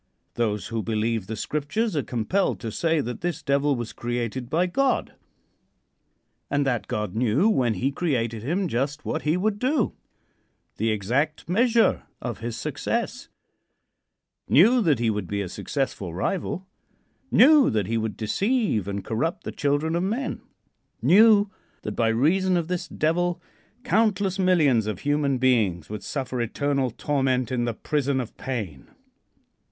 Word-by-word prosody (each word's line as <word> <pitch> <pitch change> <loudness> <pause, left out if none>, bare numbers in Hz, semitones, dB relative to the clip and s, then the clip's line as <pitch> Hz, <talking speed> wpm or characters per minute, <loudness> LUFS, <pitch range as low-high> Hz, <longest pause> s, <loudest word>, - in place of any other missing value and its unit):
Those 105 -3 -1
who 115 0 -2
believe 110 -2 -1
the 110 - -4
Scriptures 155 - -2
are 145 - +2
compelled 130 - -1
to 115 - -4
say 165 +5 +1
that 125 -1 -5
this 170 -2 -3
Devil 140 0 +2
was 120 -2 -5
created 120 +1 -3
by 170 +3 +2
God, 270 +9 0 1.4
and 145 0 +1
that 125 -4 -1
God 105 -3 -3
knew 120 - +2
when 125 - +2
he 130 +9 0
created 120 -8 -1
him 175 - -1
just 140 +3 -2
what 155 - -2
he 155 +3 +1
would 205 +2 0
do 255 -2 +1 0.8
the 110 +2 0
exact 120 +9 -1
measure 230 +5 +3 0.2
of 120 -5 -5
his 115 +1 -4
success; - - -3 1.2
knew 230 - +6
that 160 -9 +3
he 115 -1 +1
would 105 -4 -3
be 100 +2 -2
a 100 - -2
successful 95 - -3
rival; 185 - -2 0.6
knew 295 +1 +6
that 105 -3 0
he 115 - -2
would 110 -1 -3
deceive 195 - 0
and 100 0 -4
corrupt 140 +10 -2
the - - -4
children 145 +3 0
of 170 - +1
men; 225 +9 -2 0.6
knew 205 0 +6 0.3
that, 105 - -3
by 115 - +2
reason 175 +11 +2
of 170 -2 -1
this 180 -1 -2
Devil, 175 +2 0 0.4
countless 205 -4 +1
millions 150 - +3
of 105 -3 -4
human 145 -2 +1
beings 110 -10 +1
would 105 - -5
suffer 130 -3 -3
eternal 135 +3 0
torment 130 -1 0
in 120 -2 0
the 120 - -1
prison 140 -1 -1
of 120 -3 -5
pain. 105 - -5
140 Hz, 150 wpm, -25 LUFS, 115-175 Hz, 1.4 s, knew